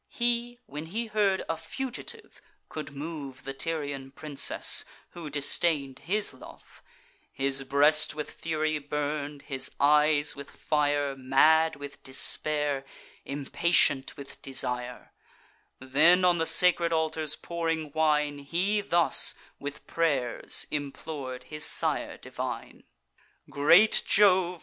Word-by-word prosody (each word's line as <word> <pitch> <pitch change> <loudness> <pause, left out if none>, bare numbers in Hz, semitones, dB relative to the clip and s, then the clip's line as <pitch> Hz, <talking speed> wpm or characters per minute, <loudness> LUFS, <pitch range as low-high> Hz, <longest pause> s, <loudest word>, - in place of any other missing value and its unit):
He, 240 0 -1
when 150 +3 -7
he 225 +7 -3
heard 205 -3 +1
a 165 - -1
fugitive 265 - -7 0.3
could 155 -2 -7
move 140 -3 -7
The 135 - -5
Tyrian 145 -3 -3
princess, 145 +1 +1 0.3
who 170 -3 -8
disdain'd 145 -1 0
his 205 +1 -1
love, 130 - -15 0.5
His 135 0 -1
breast 150 +3 +3
with 150 -1 -5
fury 155 -1 -2
burn'd, 145 0 -4
his 135 -3 -3
eyes 150 +1 +4
with 140 0 -9
fire, 145 -1 0
Mad 155 +5 +4
with 145 -1 -10
despair, 145 +1 0 0.4
impatient 140 0 +1
with 140 -1 -11
desire; 125 -2 -4 0.7
Then 155 +8 +4
on 175 -1 +3
the 165 - 0
sacred 175 -2 +3
altars 160 -1 -1
pouring 165 -2 -3
wine, 150 -2 +1
He 180 +9 0
thus 175 -4 +2 0.2
with 145 +1 -7
pray'rs 140 -8 -1
implor'd 140 -3 -5
his 150 +2 -5
sire - - 0
divine: - - -7 0.7
"Great 170 +9 +6
Jove! 185 -3 +4
150 Hz, 115 wpm, -28 LUFS, 140-165 Hz, 0.7 s, Great